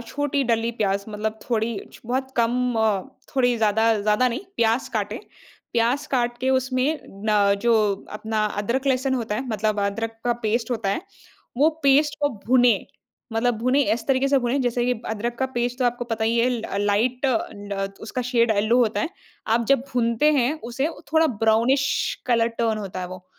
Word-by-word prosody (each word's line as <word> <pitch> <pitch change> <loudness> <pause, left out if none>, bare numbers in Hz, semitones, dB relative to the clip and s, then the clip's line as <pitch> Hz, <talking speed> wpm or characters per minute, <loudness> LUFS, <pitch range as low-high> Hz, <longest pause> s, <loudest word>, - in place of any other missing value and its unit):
छोटी 285 +4 -1
डली 230 -1 +1
प्याज़ 200 -1 +1
मतलब 215 +1 -3
थोड़ी 225 -2 0
छ - - -14
बहुत 260 +2 -2
कम 245 +1 +1
अ, 215 -3 +2 0.3
थोड़ी 245 -3 +3
ज़्यादा, 220 +1 +3
ज़्यादा 210 +5 +2
नहीं 245 +4 -3 0.2
प्याज़ 230 +2 +1
काटें, - - -2 0.5
प्याज़ 240 +5 +1
काट 240 -2 0
के 260 +1 0
उसमें 260 +3 +1 0.3
ना 210 -1 +3 0.3
जो 235 - +5 0.5
अपना 220 -1 -1 0.2
अदरक-लहसुन 260 +3 0
होता 230 -4 -2
है 255 +5 -3
मतलब 215 -1 0
अदरक 225 +3 -3
का 240 - +3
पेस्ट 230 +3 0
होता 225 -5 -1
है 200 - -1 0.6
वो 300 +3 +6
पेस्ट 285 +2 +4
को 290 - +3 0.2
भूनें। 245 -4 +4 0.5
मतलब 235 +2 +1
भूनें 255 +5 +2
इस 225 +1 -3
तरीके 270 0 +2
से 275 0 +4
भूनें 250 +2 0
जैसे 245 -1 0
कि 250 - +2 0.2
अदरक 225 +2 -2
का 265 - +1
पेस्ट 240 +1 -1
तो 255 - +1
आपको 245 0 0
पता 225 -2 -2
ही 230 +1 +1
है 240 - +3
ल 240 -3 -2 0.2
लाइट 235 +5 +1
ड 205 -5 -2
उसका 250 +3 -3
शेड 240 -2 +2
येलो 215 +3 +3
होता 230 -3 +2
है। 320 - -1 0.5
आप 235 0 +1
जब 275 -2 +4
भूनते 235 +4 +2
हैं 270 -1 +2 0.2
उसे 270 +6 0
वो 330 - -11
थोड़ा 320 0 +5 0.2
ब्राउनिश 235 +5 +3 0.4
कलर 230 -2 +3
टर्न 225 -2 +1
होता 190 -3 -5
है 180 - -3
वो, 185 0 -10
235 Hz, 185 wpm, -23 LUFS, 220-255 Hz, 0.6 s, वो